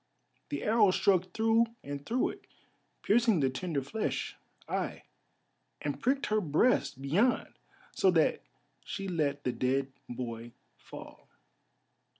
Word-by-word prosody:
The 290 Hz, -, -3 dB
arrow 215 Hz, -2 st, +5 dB
struck 185 Hz, -1 st, +2 dB
through 225 Hz, +2 st, +3 dB, 0.2 s
and 140 Hz, 0 st, -5 dB
through 240 Hz, -, +1 dB
it, -, -, -10 dB, 0.6 s
piercing 225 Hz, -3 st, +4 dB
the 135 Hz, -2 st, +2 dB
tender 145 Hz, 0 st, -2 dB
flesh, 215 Hz, +11 st, -2 dB, 0.3 s
aye, -, -, -3 dB, 0.8 s
and -, -, -3 dB
pricked 275 Hz, +2 st, +1 dB
her 215 Hz, 0 st, +1 dB
breast 150 Hz, -, +2 dB
beyond, 180 Hz, -, +1 dB, 0.4 s
so 190 Hz, -, +3 dB
that 165 Hz, -4 st, +3 dB, 0.4 s
she 195 Hz, -, -5 dB
let 145 Hz, -5 st, -1 dB
the 125 Hz, -, 0 dB
dead 135 Hz, +2 st, 0 dB, 0.2 s
boy 120 Hz, -1 st, -6 dB, 0.2 s
fall. -, -, -12 dB
175 Hz, 125 wpm, -31 LUFS, 140-220 Hz, 0.8 s, arrow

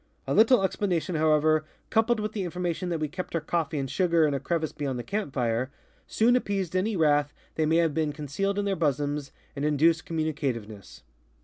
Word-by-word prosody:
A -, -, -1 dB
little 225 Hz, -1 st, +5 dB
explanation, 185 Hz, -3 st, -1 dB
however, 155 Hz, 0 st, +3 dB, 0.3 s
coupled 225 Hz, +1 st, +2 dB
with 210 Hz, 0 st, -2 dB
the 215 Hz, -, -3 dB
information 180 Hz, 0 st, -3 dB
that 170 Hz, -, -1 dB
Ave 155 Hz, -2 st, -2 dB
kept 180 Hz, +2 st, -6 dB
our 165 Hz, -, 0 dB
coffee 160 Hz, -1 st, -1 dB
and 135 Hz, -1 st, -2 dB
sugar 170 Hz, +1 st, +2 dB
in 145 Hz, -, +1 dB
a 140 Hz, -, -1 dB
crevice 160 Hz, +3 st, -1 dB
beyond 140 Hz, -4 st, -3 dB
the 120 Hz, -, -4 dB
camp 200 Hz, -, -3 dB
fire, 120 Hz, 0 st, 0 dB, 0.4 s
soon 235 Hz, +3 st, +3 dB
appeased 195 Hz, -7 st, -1 dB
any 205 Hz, +4 st, +1 dB
wrath 145 Hz, -2 st, +3 dB, 0.2 s
that 155 Hz, -1 st, 0 dB
may 160 Hz, +1 st, +3 dB
have 165 Hz, -3 st, +2 dB
been 155 Hz, 0 st, 0 dB
concealed 150 Hz, +8 st, -2 dB
in 205 Hz, -, 0 dB
their 200 Hz, -1 st, 0 dB
bosoms 145 Hz, -2 st, -1 dB, 0.2 s
and 140 Hz, -, -4 dB
induced 160 Hz, +2 st, +2 dB
communicativeness. 135 Hz, -, -4 dB
160 Hz, 195 wpm, -27 LUFS, 145-185 Hz, 0.4 s, little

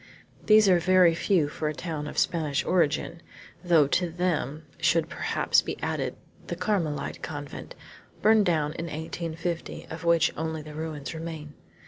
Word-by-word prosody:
These 215 Hz, -1 st, +7 dB
are 180 Hz, -2 st, +5 dB
very 180 Hz, -1 st, +5 dB
few 170 Hz, -2 st, +2 dB
for 155 Hz, +1 st, -3 dB
a 150 Hz, -, -2 dB
town 155 Hz, -3 st, -4 dB
of -, -, -8 dB
Spanish 155 Hz, -5 st, 0 dB
origin, 170 Hz, 0 st, +1 dB, 0.4 s
though 170 Hz, -4 st, +5 dB
to 180 Hz, +3 st, +1 dB
them 160 Hz, -4 st, -2 dB, 0.2 s
should 165 Hz, -1 st, +2 dB
perhaps -, -, +1 dB
be -, -, -5 dB
added -, -, -2 dB, 0.3 s
the -, -, -3 dB
Carmelite 170 Hz, -9 st, -2 dB
Convent, 145 Hz, -2 st, -7 dB, 0.4 s
burned 215 Hz, -1 st, +4 dB
down 155 Hz, -3 st, +1 dB
in 165 Hz, -, -5 dB
1850, 165 Hz, +1 st, -4 dB
of 160 Hz, +1 st, -7 dB
which 170 Hz, -2 st, +3 dB
only 160 Hz, 0 st, -3 dB
the 155 Hz, 0 st, -10 dB
ruins 155 Hz, -2 st, -5 dB
remain. 160 Hz, -2 st, -7 dB
165 Hz, 150 wpm, -27 LUFS, 150-175 Hz, 0.4 s, These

